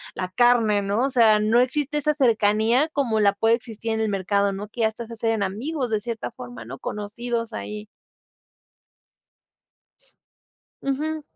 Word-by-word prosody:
la 185 - -3
carne, 220 0 +3
¿no? 200 +4 0
O 275 - 0
sea, 225 -5 +5
no 220 +3 +3
existe 290 +3 0
esa 300 +1 +2
cercanía 230 0 +3
como 235 -6 +1
la 200 -1 +4
puede 225 +3 +3
existir 225 -1 -6
en 220 - -1
el 220 - +1
mercado, 200 +1 +1
¿no? 200 +2 -6
Que 235 - -6
ya 220 - +4
hasta 225 +2 -8
se 235 - -9
hacen 225 -2 0
amigos 250 +8 -3
de 215 - +1
cierta 225 - -4
forma, 120 -1 -9
¿no? 130 +4 -8
Conocidos 230 +3 -4
ahí. 210 0 -6 3.0
Ujú. 305 +3 -2
225 Hz, 160 wpm, -24 LUFS, 205-245 Hz, 3.0 s, sea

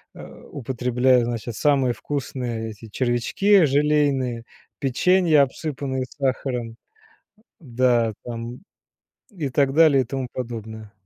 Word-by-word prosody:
э, - - -10 0.3
употребляя, 125 -1 +1
значит, 115 -1 -4
самые 135 -3 +2
вкусные 120 -6 -4
эти 110 +1 -12
червячки 135 - +2
желейные, 140 -4 +1 0.4
печенья, 155 +3 +3
обсыпанные 135 -2 -3
сахаром, 130 -4 -3 0.8
да, 120 -5 +1
там, 120 +1 -6 0.7
и 165 -10 -4
так 135 +1 +1
далее 150 -4 +5
и - - -5
тому 130 0 -3
подобное. 110 -3 -7
130 Hz, 105 wpm, -23 LUFS, 120-145 Hz, 0.8 s, далее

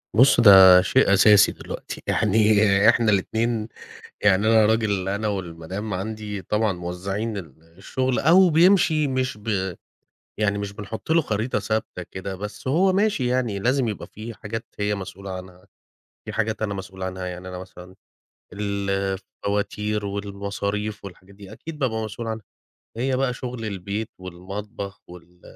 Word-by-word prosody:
بُص، 130 +1 +6
ده 95 -4 +9
شيء 100 +2 +3
أساسي 100 +1 +6
دلوقتي. - - -8
يعني 105 -1 +4
إحنا 115 -2 +3
الاتنين 110 +3 0 0.5
يعني 100 +1 +3
أنا 110 -1 +5
راجل 105 -4 +1
أنا 100 +2 -1
والمدام 95 +1 -4
عندي 105 +1 -4
طبعًا 105 +1 0
موزَّعين 95 +5 -4
ال 80 -2 -12
الشُغل، 130 +5 -1
أو 180 +5 +6
بيمشي 165 -2 +4
مش 130 -2 -1
ب 100 -4 -2 0.6
يعني 100 -1 +1
مش 100 0 -4
بنحُط 105 +8 -6
له 165 +1 +5
خريطة 110 -2 -1
ثابتة 105 -3 -3
كده، 95 0 -5
بس 105 +6 -7
هو 185 +7 +3
ماشي 200 -10 +1
يعني، 125 -5 0
لازم 130 +4 +1
يبقى 105 - -5
في 110 +2 -8
حاجات 115 +2 -6
هي 105 0 0
مسؤولة 95 0 -7
عنها، 90 0 -9 0.6
في - - -6
حاجات 110 0 -1
أنا 105 -2 -1
مسؤول 95 -1 -7
عنها. 95 0 -4
يعني 90 0 -6
أنا 90 - -6
مثلًا 90 0 -12 0.6
ال 100 -1 -3
الفواتير 100 +2 -2
والمصاريف 100 +1 -4
والحاجات 100 0 -12
دي، 100 -1 -12
أكيد 165 -2 -9
بابقى 110 -6 -1
مسؤول 110 +2 -6
عنها. 110 -2 -5 0.5
هي 130 +2 0
بقى 130 -1 0
شُغل 125 -2 -6
البيت 100 +1 -4
والمطبخ 95 +3 -7
وال 90 0 -15
105 Hz, 150 wpm, -23 LUFS, 95-115 Hz, 0.6 s, ده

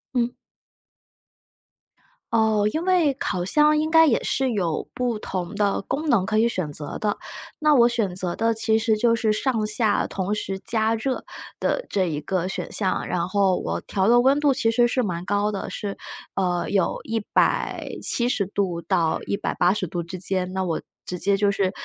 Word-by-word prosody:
嗯。 245 0 +1 2.0
哦， 220 -2 +3
因 320 - -1
为 355 -6 +3
烤 180 -1 -2
箱 300 +7 +4
应 310 +1 0
该 325 0 +7
也 235 - +2
是 265 -2 0
有 170 -6 -2
不 245 -3 -1
同 185 -3 -4
的 205 -1 +1
功 295 +7 -3
能 205 -7 +3
可 215 +1 +1
以 235 +1 +3
选 165 -9 -3
择 145 -1 -5
的。 210 -1 -1 0.4
那 305 -1 +4
我 240 -2 +6
选 220 -7 -1
择 180 -2 -3
的 225 0 +1
其 220 0 +2
实 220 -1 +1
就 230 +1 +3
是 225 -2 +1
上 220 -1 0
下 215 -1 +2
同 195 +2 -2
时 195 -2 -3
加 225 0 +1
热 255 +3 -2 0.4
的 - - -1
这 190 -2 +1
一 155 -4 -2
个 185 +1 -1
选 190 - -5
项， 190 -3 -1
然 175 0 -1
后 195 -2 +2
我 - - -3
调 195 0 -1
的 240 +1 +6
温 270 +4 +4
度 290 -2 +3
其 245 -4 +1
实 240 +1 +4
是 255 +1 0
蛮 175 -4 -3
高 205 +1 0
的。 195 - -4
是 200 -1 -4 0.4
呃， 180 -2 0
有 195 -3 +1
170 225 0 0
度 185 -4 -2
到 165 -2 +1
180 195 -1 0
度 175 +1 -4
之 170 +3 -7
间， 185 0 -1
那 190 0 -1
我 165 -3 -2 0.2
直 180 - -5
接 200 +2 +2
就 200 0 +2
是， 195 -1 0
210 Hz, 190 characters per minute, -24 LUFS, 185-240 Hz, 2.0 s, 该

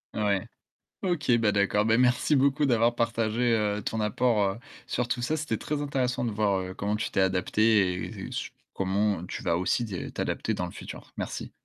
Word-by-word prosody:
Ouais. 100 -3 0 0.6
OK, 170 -8 0
ben 105 -2 +2
d'accord. 100 +1 +2
Ben 115 +1 +4
merci 125 +4 +3
beaucoup 140 +2 +3
d'avoir 120 -2 +3
partagé, 115 0 +1
heu, 105 -1 0
ton 110 - -3
apport, 110 +1 +2
heu, - - -11 0.3
sur 125 -1 -1
tout 120 +1 -1
ça. 155 +6 0
C'était 140 -7 -2
très 150 +5 -3
intéressant 130 -4 -1
de - - 0
voir, 100 -2 +1
heu, 95 0 -6
comment 105 +1 -1
tu 105 - -3
t'es - - +1
adaptée 95 +1 +3 0.3
et - - -9
sur - - -4 0.2
comment 95 -1 0
tu - - -6
vas 85 - +1
aussi 105 +6 0 0.3
t'adapter - - -2
dans 90 - -2
le 90 - -8
futur. - - -10
Merci. - - -5
110 Hz, 190 wpm, -27 LUFS, 100-125 Hz, 0.6 s, Ben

